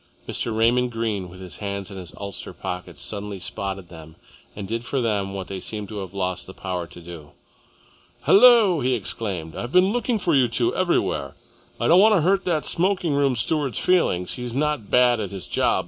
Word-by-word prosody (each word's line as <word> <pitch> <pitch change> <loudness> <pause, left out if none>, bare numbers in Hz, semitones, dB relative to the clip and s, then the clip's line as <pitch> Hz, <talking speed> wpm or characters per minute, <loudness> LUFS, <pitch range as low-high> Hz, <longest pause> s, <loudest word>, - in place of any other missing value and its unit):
Mr. 110 -2 -1
Raymond 120 +2 +3
Greene, 110 -5 -2
with 90 +1 -12
his 90 -2 -8
hands 100 -1 -5
in 95 - -8
his 90 -2 -8
ulster 100 -1 -6
pockets, 90 -4 -6
suddenly 100 -2 -5
spotted 95 -1 -5
them 80 -2 -12 0.4
and 100 -2 -6
did 115 +3 -3
for 135 +2 -2
them 105 -5 0
what 95 -1 -4
they 95 0 -6
seemed 105 +1 -5
to 105 -2 -5
have 95 -3 -6
lost 95 -2 -2
the 95 - -11
power 90 -2 -4
to 90 - -13
do. 80 -4 -11 0.9
"Hullo!" 220 -6 +6
he 130 -1 +1
exclaimed. 95 -7 -4
"I've 120 - -5
been 185 +3 +4
looking 240 -1 0
for 180 -4 0
you 130 -3 +4
two 115 0 0
everywhere. 185 -2 0 0.4
I - - +1
don't 175 +3 +7
want 215 +1 +6
to 180 - +3
hurt 190 +4 +2
that 160 -4 0
smoking 180 -3 +2
room 140 -2 +2
steward's 140 +3 0
feelings. 130 - +1
He's 125 -1 -5
not 150 -6 -1
bad 125 -2 +4
at 100 -3 -3
his 95 -4 -7
job. - - +1
110 Hz, 200 wpm, -23 LUFS, 95-150 Hz, 0.9 s, don't